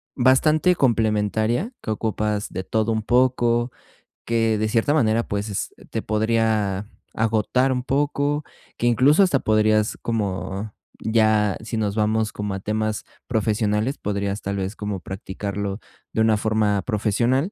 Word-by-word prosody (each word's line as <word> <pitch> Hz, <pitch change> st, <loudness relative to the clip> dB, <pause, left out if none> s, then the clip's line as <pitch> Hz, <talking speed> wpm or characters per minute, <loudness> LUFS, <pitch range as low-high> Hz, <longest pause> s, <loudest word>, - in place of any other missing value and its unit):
bastante 150 Hz, +7 st, +4 dB
complementaria, 110 Hz, -, +1 dB
que -, -, -7 dB
ocupas 105 Hz, -1 st, -1 dB
de 95 Hz, -, -3 dB
todo 110 Hz, +3 st, 0 dB
un 110 Hz, -, 0 dB
poco. 120 Hz, 0 st, +2 dB, 0.5 s
Que 115 Hz, -1 st, +1 dB
de 110 Hz, +1 st, 0 dB
cierta 115 Hz, +6 st, +2 dB
manera, 115 Hz, -6 st, +3 dB
pues, 100 Hz, -1 st, -3 dB, 0.2 s
te -, -, -2 dB
podría 110 Hz, -2 st, 0 dB, 0.3 s
agotar 115 Hz, +4 st, +1 dB
un 125 Hz, -1 st, -1 dB
poco, 145 Hz, +2 st, 0 dB, 0.3 s
que 120 Hz, -, 0 dB
incluso 135 Hz, -, +5 dB
hasta 155 Hz, -8 st, +2 dB
podrías 110 Hz, -1 st, +2 dB
como, 105 Hz, -1 st, -3 dB, 0.3 s
ya 110 Hz, -2 st, +2 dB
si 115 Hz, +1 st, -4 dB
nos 105 Hz, -2 st, -1 dB
vamos 110 Hz, 0 st, +1 dB
como 105 Hz, -1 st, -3 dB
a 95 Hz, -, -3 dB
temas 110 Hz, +1 st, -2 dB, 0.2 s
profesionales, 110 Hz, +2 st, 0 dB
podrías 100 Hz, 0 st, -2 dB
tal 100 Hz, 0 st, -3 dB
vez 95 Hz, +2 st, -3 dB
como 105 Hz, -3 st, -4 dB
practicarlo 100 Hz, +2 st, -5 dB, 0.3 s
de 110 Hz, -, 0 dB
una 110 Hz, -1 st, +4 dB
forma 105 Hz, -2 st, +1 dB
profesional. 120 Hz, -, 0 dB
110 Hz, 135 wpm, -23 LUFS, 105-120 Hz, 0.5 s, incluso